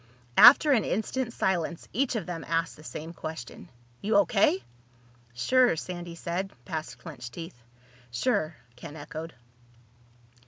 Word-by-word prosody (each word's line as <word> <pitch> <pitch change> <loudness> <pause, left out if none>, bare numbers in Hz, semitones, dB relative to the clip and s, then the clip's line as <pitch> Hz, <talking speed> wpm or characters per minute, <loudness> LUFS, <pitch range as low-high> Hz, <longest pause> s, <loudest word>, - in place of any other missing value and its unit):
After 285 +4 +9
an 235 -7 +4
instant's 235 +4 -2
silence 170 -3 -1
each 260 +4 +1
of 220 - -2
them 175 -2 -5
asked 165 0 0
the 155 - -15
same 160 +1 -7
question. 160 -6 -8 0.3
"You 210 +1 0
O.K.?" 170 -9 +3 0.7
"Sure," 245 - +4
Sandy 175 +1 -6
said, 175 +3 -3
past 155 +2 -5
clenched 125 -8 -9
teeth. 165 -5 -9 0.5
"Sure," 155 - 0 0.2
Ken 145 +4 -10
echoed. 160 +2 -7
170 Hz, 125 wpm, -28 LUFS, 155-205 Hz, 0.7 s, After